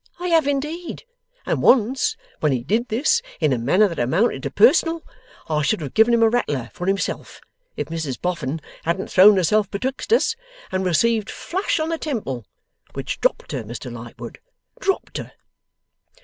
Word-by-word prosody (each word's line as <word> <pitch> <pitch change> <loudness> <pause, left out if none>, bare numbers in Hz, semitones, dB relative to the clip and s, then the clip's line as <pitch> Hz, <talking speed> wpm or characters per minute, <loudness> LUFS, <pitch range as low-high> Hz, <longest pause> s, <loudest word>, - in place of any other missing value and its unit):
I 360 0 -2
have 325 -4 +4
indeed. 300 +5 -3 0.4
And - - 0
once, 255 +1 +3 0.2
when 150 - +2
he 125 -3 -1
did 220 - 0
this 295 - +2 0.2
in 155 -5 +2
a 125 - -1
manner 180 - +4
that 170 -4 -6
amounted 165 - +1
to - - -3
personal, 330 -8 +4 0.4
I 150 -1 0
should 150 +9 +1
have 145 -4 -6
given 225 +2 +5
him 230 - +3
a 225 - +6
rattler 145 - -1
for 180 - -5
himself, 195 +1 -2 0.4
if - - -2
Mrs 155 -5 -4
Boffin 165 -4 -2 0.2
hadn't 170 +4 -2
thrown 200 +2 +7
herself 200 +3 +2
betwixt 260 - -4
us, 460 0 +3 0.4
and 190 0 -1
received 220 +5 +2
flush 370 -1 -2
on 315 +1 -1
the 330 -1 -2
temple. 135 - -4 0.5
Which - - -5
dropped - - 0
her, - - -3
Mr 120 +2 -7
Lightwood. 115 0 -9 0.4
Dropped 390 -6 -1
her. - - -8
200 Hz, 170 wpm, -22 LUFS, -, 0.5 s, thrown